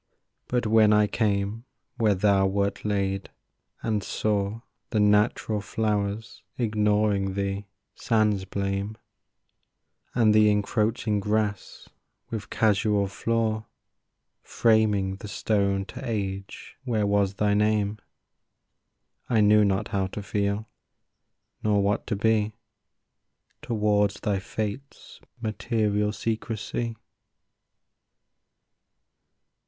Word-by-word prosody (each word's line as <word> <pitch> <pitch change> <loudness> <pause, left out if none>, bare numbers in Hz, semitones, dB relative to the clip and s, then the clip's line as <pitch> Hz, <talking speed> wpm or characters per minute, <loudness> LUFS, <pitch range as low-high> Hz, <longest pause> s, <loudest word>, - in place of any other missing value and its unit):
But 125 -1 0
when 110 -1 +5
I 105 0 +5
came 105 +1 -1 0.3
where 110 -3 +3
thou 95 0 +3
wert 100 +1 -1
laid, 100 -2 -1 0.5
and 110 -2 0
saw 105 +2 -1 0.3
The 110 - 0
natural 105 +1 +2
flowers 105 0 -2 0.2
ignoring 105 -3 +1
thee 100 0 -2 0.3
sans 105 -3 +1
blame, 100 +2 -3 1.2
And 110 -3 +4
the 105 0 +6
encroaching 105 +1 +1
grass, 105 -1 -2 0.4
with 105 -4 -5
casual 105 -1 +2
flaw, 110 +2 -1 0.7
Framing 105 -4 +2
the 105 - -9
stone 100 -2 0
to - - -9
age 100 -5 -4
where 115 -5 0
was 100 -1 +1
thy 105 0 +2
name, 105 0 +1 1.3
I 115 - +3
knew 105 0 +6
not 95 -1 0
how 95 -1 0
to 100 +2 -7
feel, 100 +2 -1 0.9
nor 105 -1 +2
what 100 +1 0
to - - 0
be 110 0 +1 1.1
Towards 105 -3 +1
thy 100 -2 0
fate's 110 +7 -6 0.2
material 105 -2 0
secrecy. 115 +1 -3
105 Hz, 95 wpm, -26 LUFS, 100-110 Hz, 1.3 s, the